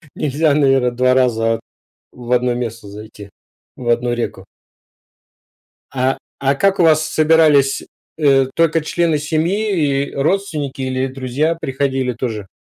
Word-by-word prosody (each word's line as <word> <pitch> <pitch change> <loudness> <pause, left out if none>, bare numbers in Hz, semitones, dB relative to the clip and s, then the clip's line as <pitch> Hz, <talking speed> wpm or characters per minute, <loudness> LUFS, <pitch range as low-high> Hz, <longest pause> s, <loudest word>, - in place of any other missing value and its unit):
Нельзя, 150 +1 +1
наверно, 135 -4 +2
2 125 +1 +2
раза 115 -3 +1 0.5
в 125 0 -7
одно 125 0 +2
место 115 -3 -5
зайти, 105 0 -11 0.5
в 120 - -6
одну 120 +1 +1
реку. 115 -5 -4 1.5
А 130 0 0 0.2
а 140 0 +2
как 195 +6 +1
у - - +5
вас 155 -1 +3
собирались, 155 -3 +3 0.4
э: 135 -3 +4
только 165 -1 +2
члены 165 0 0
семьи 155 -1 0
и - - -13
родственники 150 -3 -2
или 130 0 -1
друзья 135 +5 -2
приходили 135 -2 -1
тоже? 110 -4 -5
135 Hz, 130 wpm, -18 LUFS, 125-155 Hz, 1.5 s, у